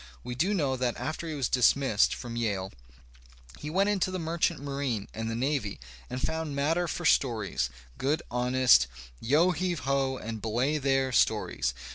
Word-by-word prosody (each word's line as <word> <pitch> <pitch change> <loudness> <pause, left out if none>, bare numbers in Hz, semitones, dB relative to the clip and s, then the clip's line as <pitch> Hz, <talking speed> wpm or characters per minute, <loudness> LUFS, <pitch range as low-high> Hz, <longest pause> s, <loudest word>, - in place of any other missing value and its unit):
We 125 - -5
do 180 +12 +1
know 140 -7 +1
that 125 -1 -1
after 160 +1 -4
he 155 - -4
was 135 -4 0
dismissed 125 -3 +3
from 120 -2 -7
Yale 100 -5 -2 0.9
he 150 - -5
went 195 +5 +2
into 195 -3 +1
the 185 - -3
merchant 165 0 0
marine 135 -7 -3
and 110 +1 -3
the 115 - -2
navy 125 - -1 0.3
and 130 - -4
found 160 +1 -2
matter 165 +5 +1
for 175 - -4
stories, 110 - +2 0.3
good, 145 +4 0
honest, 125 - +4 0.3
yo 155 - +3
heave 175 -2 -2
ho 135 -1 0
and 110 -2 -6
belay 125 +8 0
there 135 -1 +1
stories. - - +1
135 Hz, 165 wpm, -28 LUFS, 120-155 Hz, 0.9 s, honest